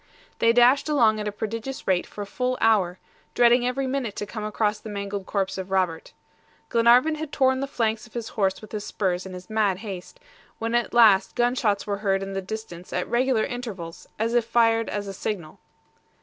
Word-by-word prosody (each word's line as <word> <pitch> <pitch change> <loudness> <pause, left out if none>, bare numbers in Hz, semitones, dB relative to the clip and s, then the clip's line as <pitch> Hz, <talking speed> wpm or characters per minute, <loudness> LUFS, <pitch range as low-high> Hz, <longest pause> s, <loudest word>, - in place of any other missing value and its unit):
They 230 - +5
dashed 245 +5 +4
along 230 -7 +3
at 210 - -3
a - - -1
prodigious 225 +5 -5
rate 185 -2 +1
for 205 - -7
a - - -7
full 250 +5 -2
hour, 195 -5 +3 0.4
dreading 240 +1 +5
every 265 +2 -1
minute 260 -5 -2
to 205 - -4
come 215 +1 -6
across 210 0 0
the 220 - -9
mangled 200 -1 -5
corpse 195 -1 -1
of 190 0 -6
Robert. 185 -4 -1 0.6
Glenarvan 240 +6 +5
had 310 -1 -5
torn 260 -2 +2
the 275 - -2
flanks 225 -3 -1
of 235 - -23
his 235 -2 -4
horse 195 -1 -1
with 215 - -11
his 210 -1 -4
spurs 185 -3 -2
in 185 - -9
his 180 0 -9
mad 215 -4 +1
haste, 195 - -8 0.4
when 230 +1 -3
at 240 0 0
last 215 -5 +5
gun 240 0 +2
shots 210 -5 0
were 200 -1 -2
heard 195 -1 0
in 195 0 -6
the 195 - -2
distance 190 -3 -8
at 180 - -2
regular 240 -1 +2
intervals, 215 -10 -6
as 230 +2 -1
if 240 -1 +3
fired 230 0 +2
as 205 -1 -3
a 195 - -5
signal. 180 -5 -5
220 Hz, 205 wpm, -25 LUFS, 195-240 Hz, 0.6 s, They